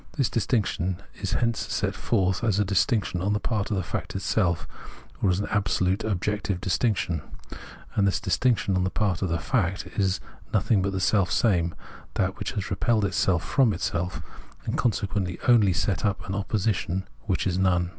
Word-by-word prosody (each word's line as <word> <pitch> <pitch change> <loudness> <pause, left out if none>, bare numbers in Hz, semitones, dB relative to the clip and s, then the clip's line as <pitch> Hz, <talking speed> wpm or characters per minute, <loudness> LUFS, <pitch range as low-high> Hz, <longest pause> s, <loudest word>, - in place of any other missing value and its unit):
The 140 - +1
distinction 105 -6 0 0.2
is - - -1
hence 115 -2 +1
set - - 0
forth 95 -2 0
as 110 -4 +2
a 105 - +3
dis 100 0 +3
tinction 105 -7 -1
on 100 +2 +1
the 105 - +1
part 110 -1 -1
of 105 - 0
the 95 - 0
fact - - -4
itself, 95 -4 0 0.5
or 100 - +3
as 90 +1 +2
an 100 - -1
absolute 100 -1 +1
(objective) 105 -1 -1
distinction; 95 - 0 0.7
and 100 -1 +3
this 95 - +1
distinction 100 +1 +1
on 90 - +2
the 95 - +1
part 100 -4 0
of 95 - 0
the 85 - +1
fact 95 - 0
is 95 -2 +2
thus - - -21
nothing 105 0 +3
but 100 +1 0
the 95 - -1
selfsame, 90 -2 +2 0.4
that 95 +1 0
which 100 - -3
has 100 -3 -4
repelled 105 +2 +2
itself 90 -1 +1
from 125 -6 +3
itself, 90 0 -2 0.4
and - - -1
consequently 100 -4 0
only 115 -6 +6
set 90 +2 0
up 100 -2 -1
an 95 - -3
opposition 100 -2 -1 0.2
which 95 - 0
is 90 -1 0
none. 90 -2 +2
95 Hz, 185 wpm, -26 LUFS, 90-105 Hz, 0.7 s, only